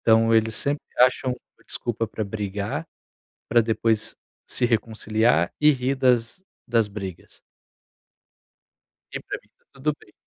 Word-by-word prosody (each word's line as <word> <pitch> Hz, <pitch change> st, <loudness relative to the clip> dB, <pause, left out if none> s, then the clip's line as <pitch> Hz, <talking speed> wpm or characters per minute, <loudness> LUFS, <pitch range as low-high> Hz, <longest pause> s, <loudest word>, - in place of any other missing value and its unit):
Então 115 Hz, 0 st, +4 dB
eles 110 Hz, 0 st, +3 dB
sempre 145 Hz, +1 st, +3 dB
acham 125 Hz, 0 st, +3 dB, 0.3 s
desculpa 115 Hz, -1 st, -3 dB
para 110 Hz, 0 st, -4 dB
brigar, 105 Hz, +8 st, -4 dB, 0.6 s
para 120 Hz, 0 st, +5 dB
depois 110 Hz, -1 st, +1 dB, 0.3 s
se 125 Hz, -, -1 dB
reconciliar 110 Hz, -4 st, +1 dB
e 150 Hz, 0 st, +7 dB
rir 130 Hz, 0 st, 0 dB
das 125 Hz, +6 st, +1 dB, 0.2 s
das 115 Hz, -3 st, +2 dB
brigas. 95 Hz, -3 st, -8 dB, 1.7 s
E -, -, -4 dB
para -, -, -6 dB
mim -, -, -31 dB
tá -, -, -40 dB
tudo 140 Hz, +2 st, -1 dB
bem. -, -, -20 dB
115 Hz, 130 wpm, -24 LUFS, 110-125 Hz, 1.7 s, e